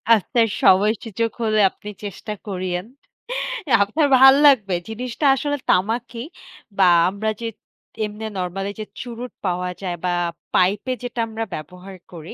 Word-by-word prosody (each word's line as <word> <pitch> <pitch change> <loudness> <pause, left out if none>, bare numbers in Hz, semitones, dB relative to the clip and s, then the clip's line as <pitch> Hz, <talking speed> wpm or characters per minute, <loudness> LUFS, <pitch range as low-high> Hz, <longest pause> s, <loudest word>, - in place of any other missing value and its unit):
আপনার 225 +3 +1
সময়সুযোগ 215 +3 +2
হলে 215 -1 +2
আপনি 210 - -11
চেষ্টা 205 +2 -6
করিয়েন। 185 -2 -3 1.0
আপনার 285 +9 +1
ভাল 265 0 +9
লাগবে। 210 -10 +4
জিনিসটা 245 +5 -4
আসলে 290 +2 -2
তামাকই 230 +5 0 0.5
বা 190 -2 +5 0.2
আমরা 210 +3 -2
যে 230 - -2 0.6
এমনে 210 +1 -6
নরমালি 195 +2 -3
যে 215 - -4 0.2
চুরুট 245 0 -7
পাওয়া 180 0 -1
যায় 180 -2 -3
বা 180 - +1 0.4
পাইপে 200 +7 +2
যেটা 245 0 -5
আমরা 225 0 -4
ব্যবহার 180 +4 -10 0.2
করি 165 -2 -9
210 Hz, 130 wpm, -21 LUFS, 185-230 Hz, 1.0 s, ভাল